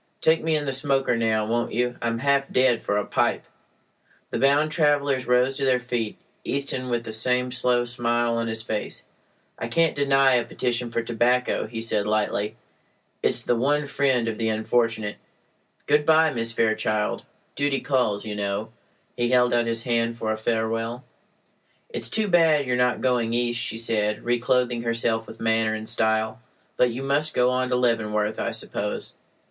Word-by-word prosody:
Take 160 0 +3
me 160 -1 +1
in 150 -1 -1
the 135 - -2
smoker 135 -2 +1
now, 110 -2 +1
won't 120 +2 -1
you? 120 +1 0
I'm 115 0 -1
half 140 +2 +1
dead 125 -2 +3
for 100 - -1
a 105 - -1
pipe." - - 0 0.9
The - - -2
bound 145 +4 +3
travelers 145 -4 +1
rose 125 +2 +2
to 140 - -2
their 130 -1 +3
feet, 120 -3 -3 0.3
Easton 135 -2 -3
with 120 -1 -1
the 110 -2 -6
same 125 +3 0
slow 125 -1 +1
smile 120 -1 0
on 115 0 -1
his 110 0 -2
face. 110 -2 -4 0.5
"I - - -3
can't 165 -1 +2
deny 135 -1 +4
a 120 -1 +3
petition 120 0 -2
for 115 0 -2
tobacco," 120 +1 +1
he 115 0 -6
said, 105 -2 -1
lightly. 105 -1 0 0.7
"It's - - 0
the 120 - +1
one 145 +5 +1
friend 135 -4 +1
of 110 -1 -3
the 110 -1 0
unfortunate. 110 -1 0 0.7
Good 150 +1 +3
bye, 160 0 +4
Miss 115 -1 -2
Fairchild. 110 -2 0 0.3
Duty 145 -1 0
calls, 120 -7 0
you 105 -1 -4
know." 100 +2 -3 0.4
He 120 -1 0
held 125 -1 +3
out 120 -1 +2
his 115 0 -2
hand 115 -1 0
for 110 -1 -2
a - - 0
farewell. 115 +2 -2 0.9
"It's 470 - -2
too 220 -1 +1
bad 165 -5 +4
you 125 - -1
are - - +3
not 125 0 +1
going 120 -3 +1
East," 120 0 0
she 110 - -2
said, 105 -2 0
reclothing 120 0 +1
herself 115 -1 0
with - - -11
manner 110 -1 +1
and 110 0 -6
style. 110 +2 0 0.3
"But 125 - +3
you 120 +3 -5
must 145 +3 0
go 125 0 +3
on 130 0 0
to 125 - +1
Leavenworth, 110 -3 0
I - - -1
suppose?" - - -4
120 Hz, 180 wpm, -24 LUFS, 115-130 Hz, 0.9 s, deny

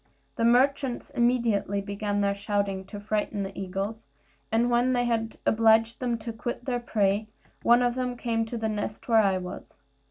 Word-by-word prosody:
The 230 - +1
merchants 265 +2 +2
immediately 235 -6 +1
began 205 +1 -2
their 200 0 +2
shouting 200 -1 -2
to 205 +1 -8
frighten 210 0 -2
the 195 0 -6
eagles; 195 +4 -4 0.4
and 235 +2 +2
when 245 +2 +3
they 245 -1 +1
had 225 -1 -1
obliged 225 +1 +4
them 240 -2 -1
to 225 +1 -6
quit 240 +2 -5
their 245 -2 -1
prey, 210 -2 0 0.3
one 240 +1 +5
of 245 0 +2
them 250 -1 -3
came 230 -1 0
to 235 - -4
the 220 -1 -1
nest 210 0 -4
where 225 -2 +5
I 195 -2 +2
was. 180 -1 -8
225 Hz, 180 wpm, -27 LUFS, 205-240 Hz, 0.4 s, one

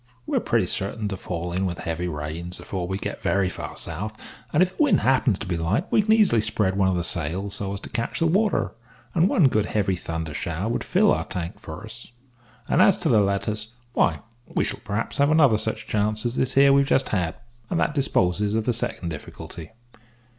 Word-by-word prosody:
We - - -2
are - - +4
pretty - - +1
certain 105 +2 -2
to 95 - -3
fall 85 -1 -4
in 95 +2 0
with 85 -1 -4
heavy 85 +2 -3
rains 80 +3 -4
afore 90 -3 -4
we 95 +1 -2
get - - -5
very 95 -2 +1
far - - -7
south; 105 +7 -4 0.3
and 160 - +5
if 185 0 -3
the - - -2
wind 290 - +4
happens 130 -5 +3
to - - -6
be 90 -3 -2
light 90 - 0
we - - +5
can 215 +1 0
easily 205 - +4
spread 105 -3 0
one 95 -1 +3
of 95 - +2
the 85 - -1
sails 90 +5 -1
so 100 -1 -1
as 100 - -6
to - - -7
catch 115 - -2
the 165 - +2
water, 200 +6 +2 0.4
and 175 +3 +3
one 160 - +5
good 110 -5 +1
heavy 100 -3 0
thunder 80 -2 -5
shower 85 +6 -3
would 120 - -1
fill - - +3
our - - 0
tank 85 -1 -5
for 80 +5 -8
us, 115 +2 -10 0.6
and - - +3
as 190 0 +6
to 170 - -1
letters, 105 0 +1 0.2
why, - - +2 0.3
we - - 0
shall - - -2
perhaps 105 +3 -3
have 140 +1 +4
such - - +4
another 140 -9 +5 0.3
chance 105 +1 0
as 120 +1 -1
this 130 0 0
here 140 +1 +7
that - - +6
we've 140 0 +4
just 135 - +2
had, 90 -5 -1 0.3
and 165 - 0
that - - +1
disposes 105 -7 +1
of 110 -1 0
the 125 - +2
second 95 -6 -2
difficulty. 80 +1 -8
105 Hz, 225 wpm, -24 LUFS, 90-130 Hz, 0.6 s, here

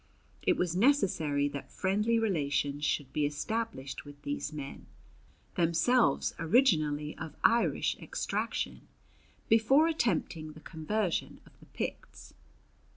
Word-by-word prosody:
It - - +2
was 175 -1 0
necessary 180 - +2
that 140 -1 -7
friendly 210 +4 +1
relations 145 -8 0
should 140 -3 -1
be 150 - +1
established 150 -1 -4
with 145 -1 -12
these 145 +2 -3
men, 145 -2 -8 0.7
themselves 180 +9 +2
originally 155 - +2
of 160 -2 -7
Irish 235 +1 +3
extraction, - - -3 0.6
before 265 +8 +5
attempting 170 - -1
the 155 - -12
conversion 170 +5 -2
of - - -18
the - - -18
Picts. - - -6
165 Hz, 110 wpm, -31 LUFS, 145-225 Hz, 0.7 s, before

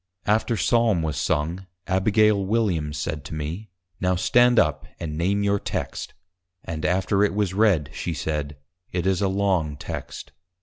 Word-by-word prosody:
After 110 +2 +1
Psalm 115 -8 +2
was 80 -2 -2
sung 80 +4 -1 0.2
Abigail 100 +2 +3
Williams 95 -9 0
said 75 0 -3
to 80 - -6
me, 80 +8 -5 0.3
Now 90 -1 +1
stand 120 +6 +4
up, 75 -7 +2
and 75 -2 -4
name 100 +5 +1
your 100 0 +2
Text! - - -4 0.5
And 80 -1 -4
after 95 +2 +2
it 100 - +1
was 100 -3 0
read, 95 -9 +2
she 85 0 -3
said, 75 0 -3 0.3
_It 90 -1 -2
is 95 -1 +1
a 100 - +2
long 95 -6 0
Text. 75 - -7
95 Hz, 160 wpm, -24 LUFS, 80-100 Hz, 0.5 s, stand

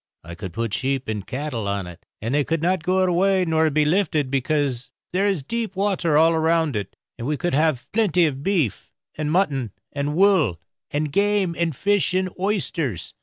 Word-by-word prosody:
I 85 +1 -9
could 95 +1 -7
put 115 +2 -3
sheep 135 +1 -1
and 105 -3 -4
cattle 130 -6 -3
on 100 -1 -2
it, 90 -1 -12 0.2
and 115 +4 -1
they 145 0 +3
could 165 +2 -2
not 185 0 +2
go 185 +3 +2
away 185 +1 +2
nor 160 -1 +2
be 150 0 +2
lifted, 155 -5 +1
because 135 -2 0 0.2
there 195 +3 +2
is 190 -8 0
deep 225 +4 -3
water 185 -6 +1
all 165 +1 +5
round 160 -3 +2
it; 100 -3 -4 0.2
and 120 - -4
we 150 0 0
would 175 -4 -1
haf 150 -4 +1
plenty 195 -6 +3
of 135 -3 -2
beef, 160 - -1 0.2
and 150 -1 -2
mutton, 140 - +1 0.2
and 145 +1 -2
wool, 180 - +3 0.3
and 150 0 -2
game, 200 -1 +1
and 165 -3 -1
fish, 200 +2 +1
and 185 -1 0
oysters. 170 - -2
155 Hz, 190 wpm, -23 LUFS, 130-185 Hz, 0.3 s, all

